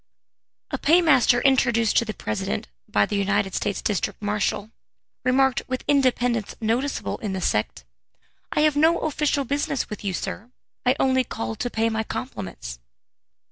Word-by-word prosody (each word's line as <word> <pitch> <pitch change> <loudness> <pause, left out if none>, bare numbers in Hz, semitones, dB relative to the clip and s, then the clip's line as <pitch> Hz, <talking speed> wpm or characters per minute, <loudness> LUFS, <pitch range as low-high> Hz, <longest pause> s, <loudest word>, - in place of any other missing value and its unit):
A - - -2
paymaster 290 -7 +4
introduced 240 -5 +3
to 235 - +4
the 215 - -4
President 105 -10 -3 0.2
by 105 0 +3
the - - -3
United 200 -1 +1
States 205 -1 -2
district 205 -3 -1
marshal, 205 0 -1 0.5
remarked 260 +1 +3
with 255 0 -3
independence 245 -5 +1
noticeable 235 +5 -1
in 205 -3 -3
the 190 - -2
sect: 105 - -1 0.7
"I - - +1
have 305 -1 +3
no 320 +3 +4
official 295 -2 0
business 280 -2 -1
with 210 - -6
you, 195 -2 -1
sir 220 +6 -5 0.4
I 255 - +5
only 260 -1 +3
called 110 - -5
to 245 - -1
pay 225 -1 0
my 220 0 -1
compliments!" 95 - -6
230 Hz, 150 wpm, -24 LUFS, 200-265 Hz, 0.7 s, I